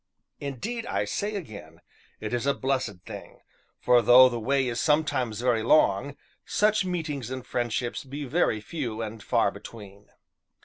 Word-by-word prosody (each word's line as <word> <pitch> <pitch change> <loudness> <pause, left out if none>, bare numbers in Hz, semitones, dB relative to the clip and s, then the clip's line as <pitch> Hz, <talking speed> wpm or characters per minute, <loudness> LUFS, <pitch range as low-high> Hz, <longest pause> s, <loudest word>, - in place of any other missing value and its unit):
Indeed, 215 - -4
I - - -1
say 210 +1 -3
again, 115 - -8 0.4
it 110 +2 -5
is 120 +2 -1
a 140 - +2
blessed 130 -8 -2
thing, - - -10 0.4
for 125 -1 +4
though 125 +2 +8
the 120 -1 -4
way 135 +3 +1
is 120 -1 -2
sometimes 140 -7 +1
very 120 -3 +2
long, 120 +1 +3 0.3
such 210 0 +2
meetings 155 -9 -3
and 130 -1 -6
friendships 120 0 -2
be 140 +2 -6
very 130 -6 +1
few 115 -4 -4
and 110 0 -7
far - - +2
between. 100 -3 -12
130 Hz, 150 wpm, -27 LUFS, 115-150 Hz, 0.4 s, though